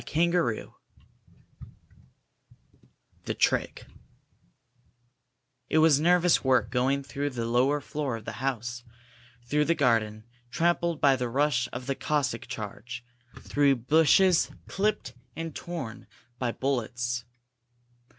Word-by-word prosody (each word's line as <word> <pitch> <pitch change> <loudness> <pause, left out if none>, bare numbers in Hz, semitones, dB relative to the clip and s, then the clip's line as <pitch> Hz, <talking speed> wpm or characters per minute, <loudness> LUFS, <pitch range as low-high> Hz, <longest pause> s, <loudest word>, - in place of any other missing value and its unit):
CHAPTER 170 -6 +1
XII - - -10 2.5
THE - - -2
TRICK - - 0 1.8
It - - +2
was 155 -3 +5
nervous 175 +1 +3
work 125 -5 +2
going 135 +3 +1
through 140 +1 -3
the 120 -4 -4
lower 125 +5 +2
floor 145 -3 -3
of 110 - -12
the - - -4
house, 120 -2 -3 0.6
through 150 +4 +1
the 170 - +2
garden, 115 -7 +1 0.3
trampled 170 +1 0
by 140 -2 +5
the 125 -2 -3
rush 130 -2 +1
of 125 +1 -6
the 135 - -1
Cossack 135 -5 -1
charge, 115 +1 -7 0.4
through 140 -1 +2
bushes 160 +8 +4 0.2
clipped 205 -9 -1 0.2
and 165 -1 -5
torn 140 -11 -7 0.3
by 125 -2 0
bullets. 120 -2 -2
135 Hz, 110 wpm, -27 LUFS, 120-155 Hz, 2.5 s, was